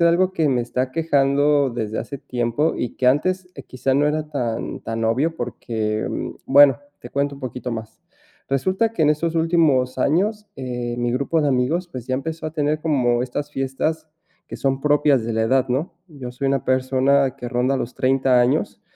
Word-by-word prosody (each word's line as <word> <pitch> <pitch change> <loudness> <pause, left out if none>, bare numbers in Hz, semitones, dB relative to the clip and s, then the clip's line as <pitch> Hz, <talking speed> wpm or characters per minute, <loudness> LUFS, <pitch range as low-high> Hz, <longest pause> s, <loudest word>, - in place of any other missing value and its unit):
algo 175 +3 +3
que 160 -5 +1
me 125 -2 +2
está 120 +1 -3
aquejando 145 -1 +2
desde 110 -2 -3
hace 140 - -7
tiempo 125 +6 -1
y 120 - -4
que 125 - 0
antes, 185 +7 +2
eh, 140 - -9
quizás 130 +1 -2
no 145 +2 +3
era 155 0 -2
tan 120 -6 -3
tan 115 0 -3
obvio 140 +9 +1
porque, 110 -3 -3 0.4
bueno, 140 -2 +6 0.2
te 120 - -11
cuento 140 0 -1
un - - -14
poquito 125 -1 -5
más. 110 -1 -7 0.5
Resulta 185 - +1
que 170 - -1
en 150 - +5
estos 165 +2 -1
últimos 155 -7 +2
años, 205 +10 0
eh, 125 -2 -4
mi 120 0 0
grupo 140 +6 0
de 150 - +1
amigos, 140 +7 0
pues 130 -7 -9
ya 130 - 0
empezó 160 +4 -4
a 155 - -5
tener 150 0 0
como 125 -7 +1
estas 145 +4 -4
fiestas 155 +4 -2 0.4
que - - -6
son 135 -1 -1
propias 145 -4 +3
de 115 - -2
la 110 0 +1
edad, 130 +3 +2
¿no?, 135 +7 -2
yo 135 -6 -8
soy 125 +3 -4
una 135 -1 +1
persona 130 +1 +2
que 125 -3 -6
ronda 125 +2 +1
los 120 - -4
30 130 -1 +2
años 120 +2 0
135 Hz, 190 wpm, -21 LUFS, 125-150 Hz, 0.5 s, bueno